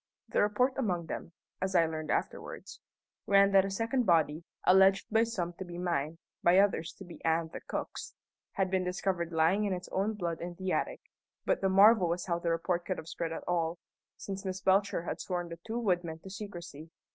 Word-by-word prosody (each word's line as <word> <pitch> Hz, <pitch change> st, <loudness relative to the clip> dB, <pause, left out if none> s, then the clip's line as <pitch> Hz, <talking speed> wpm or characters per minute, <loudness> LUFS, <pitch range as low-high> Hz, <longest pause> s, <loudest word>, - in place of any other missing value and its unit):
The -, -, +2 dB
report 230 Hz, +6 st, +2 dB
among 180 Hz, -9 st, 0 dB
them 165 Hz, -, -6 dB, 0.3 s
(as 190 Hz, 0 st, -1 dB
I 170 Hz, -1 st, +6 dB
learned 155 Hz, -1 st, -4 dB
afterwards) -, -, -3 dB, 0.5 s
ran 200 Hz, 0 st, +5 dB
that 195 Hz, -1 st, +5 dB
a -, -, -2 dB
second 230 Hz, +4 st, 0 dB
body 160 Hz, -2 st, +3 dB, 0.2 s
alleged 190 Hz, +1 st, +5 dB
by 225 Hz, +1 st, +4 dB
some 185 Hz, -7 st, -3 dB
to -, -, -3 dB
be 175 Hz, -1 st, -8 dB
mine, 165 Hz, -3 st, -1 dB, 0.2 s
by 175 Hz, +2 st, +5 dB
others 195 Hz, -4 st, +3 dB
to 195 Hz, -, -11 dB
be 170 Hz, -3 st, -12 dB
Ann 160 Hz, 0 st, +1 dB
the -, -, -6 dB
cook's -, -, -5 dB, 0.4 s
had 190 Hz, -1 st, 0 dB
been 190 Hz, -1 st, +1 dB
discovered 180 Hz, -1 st, -1 dB
lying 165 Hz, +6 st, +3 dB
in 200 Hz, -, 0 dB
its 180 Hz, 0 st, -6 dB
own 205 Hz, +3 st, 0 dB
blood 170 Hz, -4 st, -3 dB
in 175 Hz, 0 st, -5 dB
the 185 Hz, +1 st, -3 dB
attic; -, -, -1 dB, 0.4 s
but -, -, +1 dB
the 195 Hz, -, +2 dB
marvel 195 Hz, -1 st, +6 dB
was 175 Hz, +1 st, -2 dB
how 170 Hz, -2 st, -1 dB
the 170 Hz, -, -1 dB
report 170 Hz, +1 st, 0 dB
could 185 Hz, -, -3 dB
have 155 Hz, -, -8 dB
spread 165 Hz, 0 st, -4 dB
at 165 Hz, -, -5 dB
all, 170 Hz, -1 st, 0 dB, 0.4 s
since 195 Hz, 0 st, -6 dB
Miss 190 Hz, -1 st, -3 dB
Belcher 190 Hz, -1 st, +2 dB
had -, -, -4 dB
sworn 175 Hz, -2 st, -3 dB
the 170 Hz, 0 st, -8 dB
two 225 Hz, +1 st, -2 dB
woodmen 175 Hz, -8 st, 0 dB
to 190 Hz, -, -9 dB
secrecy. 175 Hz, -6 st, -8 dB
180 Hz, 205 wpm, -31 LUFS, 170-195 Hz, 0.5 s, I